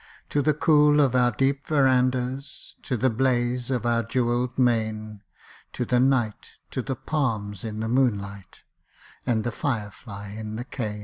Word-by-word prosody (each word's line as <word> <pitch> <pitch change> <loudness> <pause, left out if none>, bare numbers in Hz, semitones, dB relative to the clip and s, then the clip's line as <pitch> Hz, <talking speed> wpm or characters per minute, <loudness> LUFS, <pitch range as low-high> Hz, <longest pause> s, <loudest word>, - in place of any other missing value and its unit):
To 145 - +1
the 150 +1 +2
cool 150 -1 +5
of 135 -4 +4
our 125 -1 +4
deep 135 +4 0
verandas 130 -2 0
To 125 - -2
the 130 +2 +2
blaze 120 0 0
of 125 -3 -1
our 120 -1 +2
jewelled 120 +1 -1
main, 110 -4 0 0.5
To 125 - -2
the 125 +1 +2
night, 125 -5 +1 0.2
to 130 - -2
the 135 +1 -3
palms 115 -8 -2
in 110 -1 -4
the 110 - -2
moonlight, 100 -6 -1 0.6
And 110 -3 +1
the 120 - -2
fire 110 -2 -2
fly 105 -3 -9
in 110 +1 -6
the 120 +2 -5
cane! 110 -6 -4
120 Hz, 165 wpm, -25 LUFS, 110-130 Hz, 0.6 s, cool